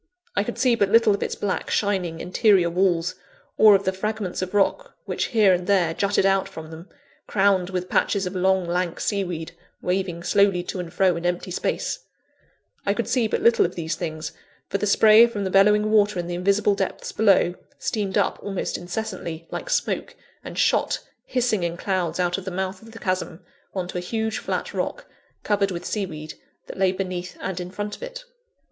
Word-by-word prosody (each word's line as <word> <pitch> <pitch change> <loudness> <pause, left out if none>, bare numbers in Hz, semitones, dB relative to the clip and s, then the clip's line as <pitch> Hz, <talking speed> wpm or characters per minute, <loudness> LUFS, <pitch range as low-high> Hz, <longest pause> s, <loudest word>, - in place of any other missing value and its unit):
I 205 - +2
could 240 - -5
see 255 -2 +3
but 200 -4 +2
little 225 -1 +5
of 200 - -3
its - - -2
black, 200 -2 -2
shining, 185 -6 0
interior 185 -2 +3
walls, 175 -1 +1 0.4
or 215 -2 +7
of 195 - +1
the 190 - 0
fragments 210 -1 -3
of 185 +2 -4
rock 200 -1 +1
which - - -1
here 210 -5 +4
and 180 0 -1
there 180 -5 +3
jutted 200 +2 +1
out 195 0 +2
from 160 0 -9
them, 165 +4 -10 0.4
crowned 195 -2 +2
with 180 -1 -3
patches 200 0 +1
of 180 +1 -4
long, 190 0 +2
lank, 175 0 -1
sea 200 -2 0
weed 165 -3 -5 0.3
waving 180 -2 -2
slowly 200 -2 +3
to 185 - -5
and 175 -2 -5
fro 180 0 +3
in 170 - -6
empty 175 +1 -1
space - - -2 0.8
I 200 - +1
could 235 - -2
see 245 -4 +2
but - - -2
little 235 0 +5
of 175 - -2
these 165 -1 -2
things, 155 -1 -4 0.4
for 200 - -1
the 210 - 0
spray 220 +3 +7
from 210 -4 -4
the 190 - -2
bellowing 210 +2 +4
water 210 -2 +3
in 175 - -2
the 175 - -4
invisible 200 +3 +2
depths 195 -1 -3
below, 200 -4 +3 0.2
steamed 200 -4 -2
up - - +1
almost 195 -2 -3
incessantly, 175 -3 -5
like - - -5
smoke, - - -1 0.3
and - - -8
shot, - - +2 0.3
hissing 245 -6 0
in 170 0 -2
clouds 180 -3 -1
out 180 +1 +1
of 190 - -11
the - - -2
mouth 190 +1 -3
of 225 0 -13
the 225 - -11
chasm, 185 -4 -3 0.3
on 185 -2 -2
to 180 - -3
a - - -5
huge 220 +4 -2
flat - - -3
rock, - - -3 0.4
covered 200 -1 +1
with 175 -2 -5
sea 205 -3 -2
weed, 155 -2 -8 0.3
that - - -9
lay 190 -1 +4
beneath 185 -1 -4
and 190 -1 -4
in 180 0 -5
front 205 +2 -5
of - - -18
it. - - -7
190 Hz, 205 wpm, -24 LUFS, 180-205 Hz, 0.8 s, or